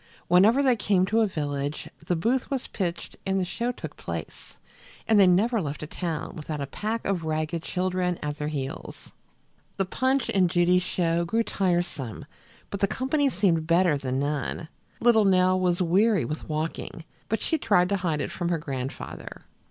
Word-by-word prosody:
Whenever 210 +10 +5
they 255 -3 +4
came 195 -4 +2
to 220 +4 +2
a 220 - +3
village, 145 -4 -3 0.2
the 175 +2 0
booth 235 +10 0
was 270 -3 -2
pitched 175 -3 -4
and 195 0 0
the 185 - 0
show 235 +7 -2
took - - -8
place, - - -7 0.5
and 220 -2 +5
they 195 - +7
never 210 +5 +3
left 150 -2 -4
a - - -3
town 165 +1 -4
without 155 -1 -5
a 140 - -2
pack 215 +11 -3
of 190 -4 0
ragged 155 +1 -2
children 180 0 -1
at 145 0 -2
their 150 - -2
heels. 140 -3 -6 0.7
The 195 - +1
Punch 260 +6 +1
and 185 -3 +3
Judy 175 +1 +4
show 170 -2 0
grew 225 +7 +1
tiresome, 175 - -1 0.5
but 200 - -3
the 200 - +3
company 275 +6 +1
seemed 175 -7 +1
better 170 -1 +4
than 130 -2 -2
none. 145 +2 -2 0.3
Little 230 -2 +5
Nell 185 -1 +4
was 180 0 +1
weary 195 +3 +3
with 155 +1 -5
walking, 160 +1 -4 0.2
but 220 - 0
she 320 - 0
tried 180 -8 +3
to 200 - +1
hide 165 -5 -1
it - - -3
from 175 -1 -2
her 170 - +1
grandfather. 135 -4 -6
180 Hz, 180 wpm, -26 LUFS, 155-205 Hz, 0.7 s, they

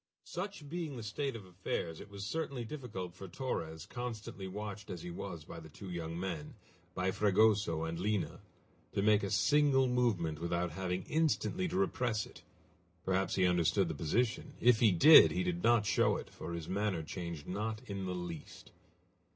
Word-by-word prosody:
Such 180 -4 -5
being 160 -3 -4
the 115 - -6
state 130 +5 -2
of 105 -4 -8
affairs 90 -2 -4
it - - -11
was 100 -1 -6
certainly 140 -2 -3
difficult 110 - -6
for 95 +1 -9
Torres, 80 - -4
constantly 115 -5 -6
watched 105 +2 -6
as 90 -3 -6
he 90 - -5
was 85 -3 -6
by 85 - -9
the 80 -1 -11
two 90 +5 -9
young 85 -1 -4
men, 85 -5 -4 0.4
by 95 +1 +1
Fragoso 105 -5 +3
and 80 +1 -3
Lina, 105 +1 -1 0.5
to 100 - 0
make 105 0 +5
a 100 - -2
single 135 +4 +4
movement 105 -12 +1
without 85 0 -1
having 90 +2 -2
instantly 165 - +1
to 175 - -4
repress 125 - 0
it. - - -14 0.6
Perhaps 95 0 +1
he 95 - +3
understood 90 -3 +3
the - - -2
position. 110 +9 0
If 120 -2 +5
he 110 -3 +6
did, 150 - +9
he 180 +1 -1
did 180 -1 -1
not 120 -5 +4
show - - +3
it, - - -8
for 85 - -7
his 85 -2 -5
manner 95 -4 -1
changed 85 -2 -6
not 110 +4 -3
in 100 -4 -4
the 90 - -2
least. 85 -4 -7
100 Hz, 180 wpm, -34 LUFS, 90-120 Hz, 0.6 s, did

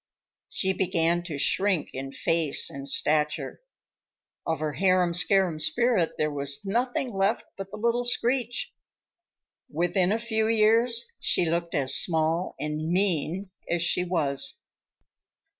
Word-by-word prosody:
She 190 -1 -1
began 175 -2 +1
to 160 -5 -5
shrink 185 +3 +1
in 135 +1 -6
face 165 0 +1
and 140 0 -6
stature. 150 - 0 0.9
Of 160 - -1
her 155 -1 -2
harum 185 -1 +2
scarum 180 -2 +2
spirit 235 -2 +1
there 150 0 0
was 140 +5 -3
nothing 245 +4 -1
left 195 +3 0
but 195 0 -7
the 210 - -8
little 235 +2 0
screech. 245 0 0 1.0
Within 175 +4 0
a 220 - +2
few 220 -1 -1
years 230 +2 +3
she 175 - +2
looked 170 +1 -2
as 135 -3 +1
small 165 +1 +1
and 150 0 -3
mean 180 +2 -1 0.2
as 170 -1 +1
she 180 - +2
was. 155 -6 -1
180 Hz, 130 wpm, -26 LUFS, 155-215 Hz, 1.0 s, years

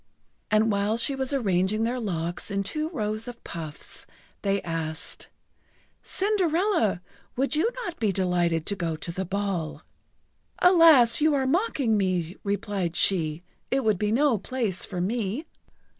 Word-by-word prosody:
And 215 +1 +3
while 205 +2 +1
she 235 +4 +1
was 265 0 -2
arranging 210 -4 +1
their 245 +2 -1
locks 175 -5 -2
in 200 -1 -1
two 305 +9 -2
rows 215 -6 -2
of 240 -1 -9
puffs, 160 -3 -7 0.3
they 200 -1 +1
asked: 165 +1 -4 0.7
"Cinderella, 365 - +1 0.3
would 270 +2 +1
you 325 +9 +2 0.2
not 345 - -6
be 215 -3 +2
delighted 175 -3 +1
to 200 - 0
go 170 -4 -2
to 165 +2 -5
the 190 +2 -3
ball?" 190 -4 -3 0.7
"Alas, 325 -10 +6
you 305 -1 +4
are 270 -1 +1
mocking 275 - +1
me!" 185 -3 0
replied 200 -4 -2
she. 165 -4 +1 0.3
"It 270 0 +1
would 215 -4 +2
be 210 0 0
no 255 -2 +3
place 220 -3 -2
for 180 -3 -4
me!" 225 - -2
210 Hz, 145 wpm, -26 LUFS, 180-265 Hz, 0.7 s, Alas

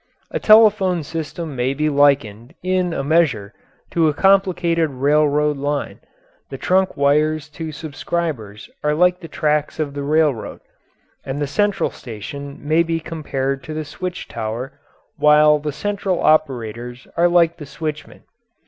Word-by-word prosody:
A - - -2
telephone 210 -6 +5
system 160 0 -5
may 130 +2 -1
be 150 +2 0
likened, 140 - +1
in 185 -1 0
a 160 - -2
measure, 140 -9 +1 0.4
to 165 -2 +2
a 150 - 0
complicated 180 -4 +2
railroad 150 +2 +2
line: 145 +1 -3 0.5
the - - -6
trunk 190 +1 +1
wires 150 +2 +2
to 160 +1 -6
subscribers 150 -8 -4 0.2
are 150 0 +1
like 180 +2 +3
the 165 - -9
tracks 150 -1 -1
of 145 -3 -2
the 145 - -4
railroad, 145 -4 0 0.6
and 135 +2 -4
the 145 - 0
central 200 +8 0
station 140 +5 -8
may 160 +2 +4
be 165 -1 -1
compared 140 -4 -3
to 155 - -6
the 155 0 -3
switch 180 +5 -6
tower, 115 +4 -5 0.4
while 150 0 +5
the 150 0 -3
central 195 +3 -2
operators 125 -5 0
are 170 +1 +4
like 170 -1 +3
the 150 -4 -9
switchmen. 150 +2 -6
150 Hz, 145 wpm, -20 LUFS, 140-170 Hz, 0.6 s, telephone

